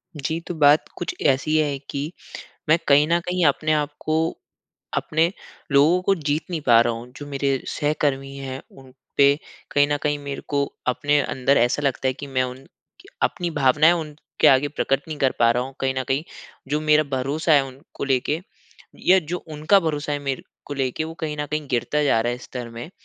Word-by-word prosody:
जी, 155 Hz, +3 st, -2 dB
तो 175 Hz, -, -6 dB
बात 150 Hz, 0 st, +5 dB
कुछ 175 Hz, -, -4 dB
ऐसी 135 Hz, +3 st, +2 dB
है 145 Hz, -3 st, +1 dB
कि 145 Hz, +4 st, -3 dB, 0.6 s
मैं 160 Hz, +2 st, +5 dB
कहीं 145 Hz, +1 st, +6 dB
न 170 Hz, +1 st, +3 dB
कहीं 180 Hz, +1 st, -1 dB
अपने 155 Hz, +2 st, +2 dB
आप 150 Hz, -1 st, 0 dB
को 155 Hz, -, 0 dB, 0.8 s
अपने 160 Hz, +3 st, +1 dB, 0.4 s
लोगों 150 Hz, +6 st, +5 dB
को 195 Hz, +1 st, +3 dB
जीत 150 Hz, -2 st, -2 dB
नहीं 170 Hz, -3 st, -2 dB
पा 115 Hz, -2 st, +7 dB
रहा 120 Hz, -, 0 dB
हूँ। 120 Hz, +2 st, -9 dB
जो 145 Hz, -, -8 dB
मेरे 140 Hz, -1 st, 0 dB
सहकर्मी 140 Hz, -2 st, -1 dB
हैं, 135 Hz, -1 st, -6 dB
उन 135 Hz, -1 st, -16 dB, 0.2 s
पे 140 Hz, 0 st, +5 dB, 0.3 s
कहीं 145 Hz, 0 st, +4 dB
न -, -, +2 dB
कहीं 145 Hz, 0 st, 0 dB
मेरे 140 Hz, -1 st, -6 dB
को 140 Hz, -1 st, +1 dB, 0.2 s
अपने 145 Hz, +3 st, +2 dB
अंदर 135 Hz, +1 st, +1 dB
ऐसा 120 Hz, +5 st, +2 dB
लगता 135 Hz, -1 st, 0 dB
है 130 Hz, -, 0 dB
कि -, -, -4 dB
मैं 130 Hz, -2 st, 0 dB
उन 130 Hz, +1 st, -6 dB
क -, -, -24 dB, 0.5 s
अपनी 175 Hz, -2 st, 0 dB
भावनाएँ 150 Hz, +2 st, +4 dB
उनके 155 Hz, -3 st, -2 dB
आगे 135 Hz, +2 st, +4 dB
प्रकट 135 Hz, -2 st, 0 dB
नहीं 155 Hz, -, -4 dB
कर 135 Hz, -2 st, +3 dB
पा 115 Hz, 0 st, +6 dB
रहा 125 Hz, -, 0 dB
हूँ, 135 Hz, +1 st, -8 dB
कहीं 130 Hz, 0 st, 0 dB
न 130 Hz, -, 0 dB
कहीं। 135 Hz, +3 st, +1 dB, 0.5 s
जो 150 Hz, +1 st, 0 dB
मेरा 155 Hz, 0 st, +4 dB
भरोसा 150 Hz, +5 st, 0 dB
है, 140 Hz, -2 st, +5 dB
उनको 135 Hz, +2 st, -9 dB
लेके 140 Hz, +3 st, 0 dB, 0.6 s
या 190 Hz, +1 st, +5 dB
जो 175 Hz, +1 st, -3 dB
उनका 155 Hz, +6 st, +3 dB
भरोसा 150 Hz, -3 st, -2 dB
है, 145 Hz, -, -1 dB
मेरे 135 Hz, -2 st, -3 dB, 0.2 s
को 145 Hz, -, -5 dB
लेके, 135 Hz, +3 st, -1 dB
वो 160 Hz, -, -7 dB
कहीं 150 Hz, -2 st, -3 dB
न 150 Hz, -, -2 dB
कहीं 150 Hz, -1 st, -2 dB
गिरता 150 Hz, +5 st, 0 dB
जा 115 Hz, -5 st, +3 dB
रहा 120 Hz, +1 st, 0 dB
है 120 Hz, -, -5 dB
स्तर 125 Hz, -2 st, -7 dB
में 115 Hz, +7 st, -8 dB
145 Hz, 205 wpm, -23 LUFS, 135-155 Hz, 0.8 s, पा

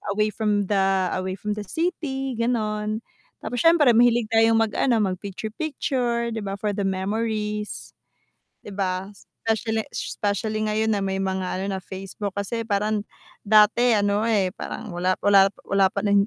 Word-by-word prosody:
away 210 Hz, 0 st, +1 dB
from 210 Hz, -1 st, 0 dB
the, 195 Hz, -2 st, +2 dB
away 185 Hz, 0 st, -3 dB
from 210 Hz, +2 st, -4 dB
the 210 Hz, -1 st, -4 dB
city 285 Hz, -, -2 dB
ganon. 215 Hz, -2 st, -1 dB, 0.4 s
Tapos 245 Hz, -, -3 dB
siyempre 330 Hz, -4 st, +5 dB
mahilig 235 Hz, -1 st, +3 dB
tayong 225 Hz, 0 st, +4 dB
mag 225 Hz, -1 st, +2 dB
ano 235 Hz, -5 st, +3 dB
mag 185 Hz, -2 st, -2 dB
picture-picture, 235 Hz, +3 st, -2 dB
'di 225 Hz, -, -3 dB
ba 195 Hz, -2 st, -4 dB
for 205 Hz, +1 st, -2 dB
the 200 Hz, 0 st, -2 dB
memories. 210 Hz, +2 st, -3 dB, 0.7 s
'Di 205 Hz, -, -8 dB
ba, 190 Hz, -1 st, -2 dB
specially 220 Hz, +2 st, -3 dB
specially 215 Hz, +1 st, -2 dB
ngayon 215 Hz, +1 st, +1 dB
na -, -, -1 dB
may 190 Hz, 0 st, -1 dB
mga 190 Hz, -1 st, -2 dB
ano -, -, -2 dB
na -, -, -5 dB
Facebook 195 Hz, +1 st, -6 dB
kasi 200 Hz, +3 st, -2 dB
parang, 210 Hz, 0 st, 0 dB, 0.4 s
dati 215 Hz, +3 st, +5 dB
ano, 205 Hz, 0 st, +1 dB
eh, 205 Hz, -4 st, +2 dB
parang 215 Hz, -4 st, -6 dB
wala 180 Hz, +1 st, +1 dB
wala 195 Hz, -1 st, +6 dB, 0.2 s
wala 195 Hz, -1 st, +3 dB
pa 200 Hz, -, -2 dB
n 200 Hz, -1 st, +4 dB
210 Hz, 160 wpm, -24 LUFS, 195-225 Hz, 0.7 s, wala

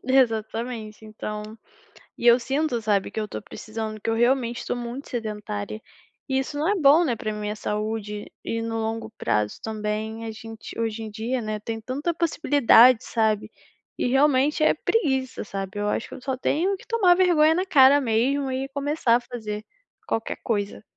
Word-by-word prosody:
Exatamente, 225 Hz, -3 st, 0 dB
então. 215 Hz, 0 st, -6 dB, 0.8 s
E 240 Hz, -, 0 dB
eu 235 Hz, +1 st, +8 dB
sinto, 265 Hz, 0 st, -1 dB
sabe, 205 Hz, -2 st, +1 dB
que -, -, -5 dB
eu 215 Hz, -, -1 dB
estou 210 Hz, -, -6 dB
precisando 215 Hz, 0 st, -6 dB
que 225 Hz, -, -2 dB
eu -, -, +2 dB
realmente 240 Hz, 0 st, +1 dB
estou -, -, -3 dB
muito 245 Hz, +3 st, -6 dB
sedentária 210 Hz, -, -4 dB, 0.5 s
e 265 Hz, -1 st, +1 dB
isso 280 Hz, +2 st, -4 dB
não 310 Hz, +3 st, 0 dB
é 415 Hz, -, +3 dB
bom, 320 Hz, 0 st, +5 dB
né, 240 Hz, -5 st, 0 dB
para 215 Hz, 0 st, -3 dB
minha 210 Hz, 0 st, -4 dB
saúde 210 Hz, 0 st, -3 dB, 0.2 s
e 230 Hz, 0 st, -2 dB
no 225 Hz, 0 st, -3 dB
longo 220 Hz, 0 st, -3 dB
prazo 105 Hz, 0 st, 0 dB
também 220 Hz, +1 st, -3 dB
a 225 Hz, -, -4 dB
gente 225 Hz, 0 st, -10 dB
hoje 225 Hz, -1 st, -2 dB
em 215 Hz, -, -6 dB
dia, 235 Hz, +4 st, -2 dB
né, 215 Hz, -1 st, -3 dB
tem 225 Hz, +1 st, -5 dB
tanta 280 Hz, +9 st, -2 dB
possibilidade, 285 Hz, -7 st, +5 dB
sabe? 220 Hz, -3 st, 0 dB, 0.5 s
E -, -, 0 dB
realmente 280 Hz, +2 st, +3 dB
é -, -, +5 dB
preguiça, 265 Hz, -, 0 dB
sabe? 195 Hz, 0 st, -5 dB
Eu 205 Hz, -, -1 dB
acho 215 Hz, -, -2 dB
que -, -, -8 dB
eu -, -, -11 dB
só 265 Hz, -1 st, -2 dB
tenho 340 Hz, +9 st, 0 dB
que -, -, -15 dB
tomar 395 Hz, -7 st, +4 dB
vergonha 325 Hz, -4 st, +4 dB
na 370 Hz, +2 st, 0 dB
cara 280 Hz, -4 st, +6 dB
mesmo 265 Hz, +4 st, +1 dB
e 265 Hz, +1 st, -2 dB
começar 280 Hz, -4 st, +2 dB
a -, -, +3 dB
fazer 215 Hz, -4 st, -6 dB, 0.4 s
qualquer 225 Hz, -, -2 dB
coisa. 205 Hz, -2 st, -2 dB
230 Hz, 180 wpm, -24 LUFS, 215-270 Hz, 0.8 s, eu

